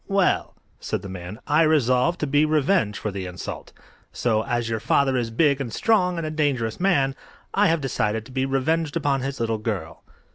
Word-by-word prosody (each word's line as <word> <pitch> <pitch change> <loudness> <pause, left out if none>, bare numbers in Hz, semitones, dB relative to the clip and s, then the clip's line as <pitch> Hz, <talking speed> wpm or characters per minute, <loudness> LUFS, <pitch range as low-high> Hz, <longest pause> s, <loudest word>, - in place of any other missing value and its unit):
Well," 195 -2 +1 0.2
said - - -3
the 100 - -7
man, 90 +3 -7
"I 150 +2 +3
resolved 155 +1 +3
to - - +1
be 145 +1 +3
revenged 155 - +2
for 110 -1 -3
the 95 -1 -5
insult. 90 0 -7 0.4
So, 110 -3 0
as 120 -3 -1
your 115 -1 -1
father 135 +4 +2
is 120 -2 0
big 140 +3 +2
and 120 -4 -4
strong 180 - +2
and 165 - -2
a 155 - -3
dangerous 140 -8 -1
man, 140 -8 +2 0.4
I 205 +1 +4
have 165 -2 +1
decided 110 -5 -1
to 130 - -13
be 130 +1 -1
revenged 155 +4 0
upon 140 -4 0
his 135 0 -4
little 115 -1 -1
girl." 95 -7 -4
135 Hz, 195 wpm, -24 LUFS, 115-155 Hz, 0.4 s, I